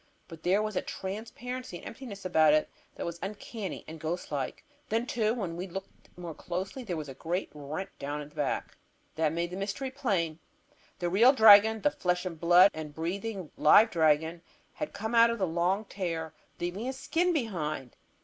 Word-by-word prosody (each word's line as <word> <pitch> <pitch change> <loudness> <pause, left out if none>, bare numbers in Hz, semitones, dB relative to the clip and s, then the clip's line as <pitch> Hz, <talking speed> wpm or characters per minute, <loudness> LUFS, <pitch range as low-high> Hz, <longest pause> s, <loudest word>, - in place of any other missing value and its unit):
But 165 -1 -11
there 195 +5 +2
was 215 -1 -3
a - - +1
transparency 225 +3 -6
and - - -13
emptiness 225 -6 -8
about 155 -4 +5
it 155 - +2 0.3
that - - -5
was 170 0 -5
uncanny 205 0 -6
and 160 0 -8
ghost 160 +3 -4
like. 140 -3 -3 0.2
Then, 225 +2 +1
too, 220 -4 +1
when 185 -8 -3
we 180 +3 -4
looked 190 +2 -9
more 175 -2 -6
closely 185 - -5
there 185 -9 -4
was 155 -2 -5
a 135 - -7
great 170 +8 -3
rent 155 +7 -6
down 145 +1 -4
the 150 - -20
back. 140 -3 -1
And - - -27 0.5
that 150 - +2
made 170 +1 -2
the 180 - -5
mystery 205 +7 -3
plain. 190 - -1 0.6
The 175 - -1
real 235 +8 +6
dragon, 220 -2 +8
the 295 - +3
flesh 180 -4 -1
and 165 -3 -5
blood 175 +3 +7
and 155 -2 -7
breathing 190 +2 -4
live 215 +9 +7
dragon, 160 0 +2 0.3
had 300 - -4
come 220 +3 -4
out 230 0 +7
of 230 - -1
that 195 - +1
long 180 +5 0
tear, 165 -6 -4 0.3
leaving 175 +6 -3
his 260 +1 -3
skin 345 +6 +1
behind! 165 - -2
185 Hz, 190 wpm, -30 LUFS, 160-220 Hz, 0.6 s, dragon